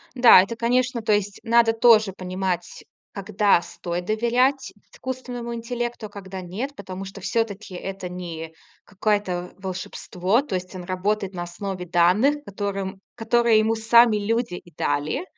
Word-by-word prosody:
Да, 245 -7 +8
это 230 +5 -5
конечно 245 +1 +1
то 215 - +1
есть 205 -1 0
надо 230 0 +4
тоже 225 -3 +5
понимать, 185 -1 -4 0.3
когда 200 -1 +2
стоит 175 +1 -5
доверять 240 +6 +1 0.2
искусственному 245 -2 -6
интеллекту, 240 -1 -4
а - - -10
когда 195 -2 -8
нет, 205 +11 -5
потому 190 -2 -7
что 195 +1 -9
всё-таки 215 -1 -2
это 190 0 -6
не 165 -3 -7 0.3
какое-то 190 -3 -1
волшебство, 185 +2 -1
то 285 - -6
есть 185 +1 -4
он 180 -1 -7
работает 195 +2 -2
на 175 - -4
основе 180 +1 -5
данных, 180 - +3
которым 195 -2 -4
которые 235 -1 +3
ему 220 +1 +2
сами 230 0 +5
люди 225 0 -1
и 175 -1 -10
дали. 145 - -1
205 Hz, 145 wpm, -23 LUFS, 185-235 Hz, 0.3 s, Да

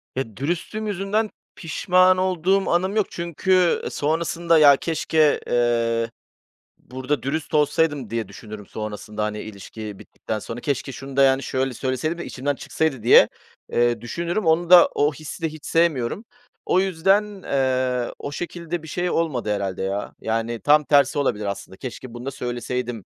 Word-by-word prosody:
Ya, 115 -6 -4
dürüstlüğüm 175 - -3
yüzünden 205 +2 -1 0.3
pişman 185 +2 +3
olduğum 185 +1 +1
anım 185 +4 +1
yok 215 -2 +2
çünkü, 175 +1 +1
eee, - - -3
sonrasında, 165 +2 +1
"Ya, 145 -2 +8
keşke, 155 -1 +1
eee, 115 -1 +1 0.7
burada 130 +1 -4
dürüst 145 +3 -3
olsaydım." 150 -4 +1
diye 115 -2 -2
düşünürüm 105 +1 -10
sonrasında, 105 0 -5
hani, 105 0 -2
ilişki 105 0 -8
bittikten 110 - -6
sonra. 115 +3 -7
"Keşke 140 -1 -2
şunu 135 +1 -9
da, 140 - +6
yani, 135 0 +3
şöyle 130 -1 -1
söyleseydim 130 +6 -2
de 170 - -6
içimden 140 +2 -2
çıksaydı." 135 -4 -2
diye, 120 - +7 0.4
eee, 120 -1 +2
düşünürüm. 170 - -3
Onu 165 +1 +2
da 180 -1 +9
o 145 +1 +2
hissi 155 +4 -9
de 160 - +1
hiç 155 -1 -12
sevmiyorum. 165 - +1 0.4
O 185 - +3
yüzden, 195 +3 +1
eee, 130 -2 0
o 145 - -5
şekilde 170 +1 -5
bir - - -9
şey 175 +3 -2
olmadı 135 -12 0
herhâlde 100 -2 -3
ya. 100 +2 -3
Yani, 115 +1 -2
tam 150 +1 +5
tersi 140 -1 +3
olabilir 105 -7 0
aslında, 100 -1 -5
"Keşke 130 0 -8
bunu 120 +1 -8
da 135 - -3
söyleseydim." 120 -2 -4
140 Hz, 160 wpm, -23 LUFS, 120-170 Hz, 0.7 s, da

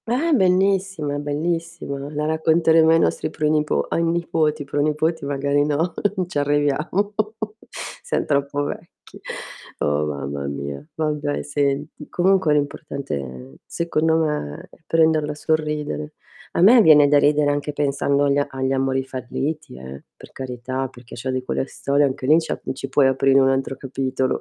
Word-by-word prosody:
Ah, 270 +9 +1
bellissima, 190 - +2
è - - -2
bellissima. 150 -1 -3
La 150 +1 -1
racconteremo 160 +1 +3
ai 165 - +6
nostri - - 0
pronipo 150 0 +1
ai - - 0
nipoti, 165 -3 0
pronipoti 150 +2 0
magari 140 +1 +1
non 150 +4 0 0.4
ci 175 - -2
arriviamo. 145 +8 0 0.9
Siam 485 - -1
troppo 140 0 0
vecchi. 165 +3 -9 0.6
Oh, 75 +1 0
mamma 70 -1 -4
mia. 70 0 -5
Vabbè, 150 -2 -1
senti, 145 +1 -2
comunque 185 -3 +3
l'importante 145 - -2
è 65 0 -9
secondo 160 -1 0
me, 150 - -2
è - - -18
prenderla 160 -2 +2
sul 155 +1 +1
ridere. 150 0 -4 0.4
A - - 0
me 230 +6 +8
viene 150 -6 +7
da 145 0 +5
ridere 145 0 +3
anche 145 +1 -2
pensando 140 -1 +1
al 140 0 +2
agli 130 -1 -2
amori 135 0 0
falliti, 135 - -4
eh. 65 +1 -9
Per - - -14
carità, 130 +1 -4
perché 120 -2 -15
c'ho 125 +3 -5
di 130 0 -2
quelle 130 - -2
storie, 140 +1 +1
anche 130 -1 -3
lì, 155 +4 +6
ci 160 - -5
a - - -3
ci 135 +1 -6
puoi 135 0 +4
aprire 135 +1 +4
un 135 0 +4
altro 135 0 -1
capitolo. 130 -1 -1
145 Hz, 150 wpm, -22 LUFS, 135-160 Hz, 0.9 s, me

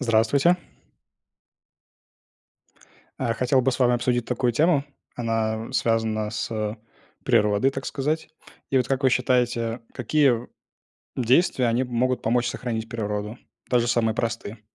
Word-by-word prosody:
уЗдравствуйте. 130 +8 +3 2.6
А, 115 - 0
хотел 125 +3 +2
бы 130 +1 +2
с - - -4
вами 125 -2 +4
обсудить 120 0 0
такую 125 0 0
тему, 150 +2 +3 0.3
она 115 0 -2
связана 110 -3 0
с, 110 - -4
э, 110 -1 -2 0.5
природой, 105 +5 +3
так 135 0 -6
сказать. 150 +4 -2 0.4
И 135 - +1
вот, 125 -1 +2
как 135 0 0
вы 130 - +5
считаете, 120 -2 +1
какие 140 +3 +3
в 120 0 -2 0.7
действия 130 +2 +2
они 120 +2 +1
могут 125 +1 0
помочь 120 +2 +1
сохранить 115 -2 -3
природу, 105 -1 -4 0.3
даже 120 -1 +2
самые 115 -2 +2
простые? 115 -2 -3
120 Hz, 130 wpm, -24 LUFS, 115-130 Hz, 2.6 s, вы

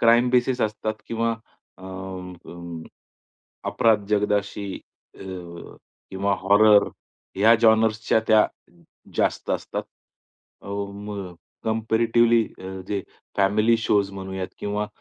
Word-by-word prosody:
Crime 120 +1 +5
basis 125 0 +2
असतात 110 0 -1
किंवा 115 0 0 0.5
अ, - - -15
अ, 90 -3 -8 0.9
अपराध 110 -3 +3
जगदाशी, 105 -1 0 0.4
अ, - - -17 0.9
किंवा 100 +1 0
हॉरर, 105 +2 +6 0.5
ह्या 110 +4 +6
जॉनर्स 110 -1 +4
च्या 110 - +4
त्या 110 -1 +6 0.7
जास्त - - 0
असतात. - - -3 0.8
अ, - - -13
मग 100 -2 -5 0.3
कम्पॅरेटिवली 115 +1 +3 0.2
अ, 95 - -7 0.2
जे 100 -1 -1 0.4
फॅमिली 105 +4 +3
शोज 100 -3 +1
म्हणूयात, 95 -1 -5
किंवा 105 0 -2
105 Hz, 105 wpm, -24 LUFS, 95-110 Hz, 0.9 s, हॉरर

